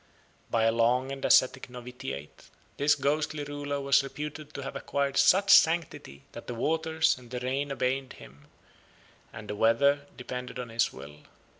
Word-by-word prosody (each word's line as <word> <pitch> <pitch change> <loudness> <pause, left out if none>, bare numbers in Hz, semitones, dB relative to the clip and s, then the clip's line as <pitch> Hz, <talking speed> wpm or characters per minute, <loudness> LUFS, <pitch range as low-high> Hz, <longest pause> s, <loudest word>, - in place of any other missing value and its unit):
By 115 -1 +1
a 115 - +4
long 120 +3 +1
and 135 -1 -7
ascetic 130 0 +3
novitiate, 125 - -9 0.3
this 145 +1 +3
ghostly 150 +2 -1
ruler 145 0 -4
was 140 0 +3
reputed 150 +2 -7
to 140 - -5
have 135 - -6
acquired 140 -1 -2
such 195 +6 +4
sanctity 160 - +3
that - - -10
the 120 - -5
waters 160 +4 +1
and 120 -2 -16
the 125 0 -4
rain 135 +3 -2
obeyed 130 0 -2
him, 70 +3 -15 0.8
and 110 -1 -10
the 105 - -4
weather 140 +7 +2
depended 125 0 -6
on 125 -2 -6
his 115 +1 +1
will. 70 +3 -11
135 Hz, 160 wpm, -28 LUFS, 120-145 Hz, 0.8 s, a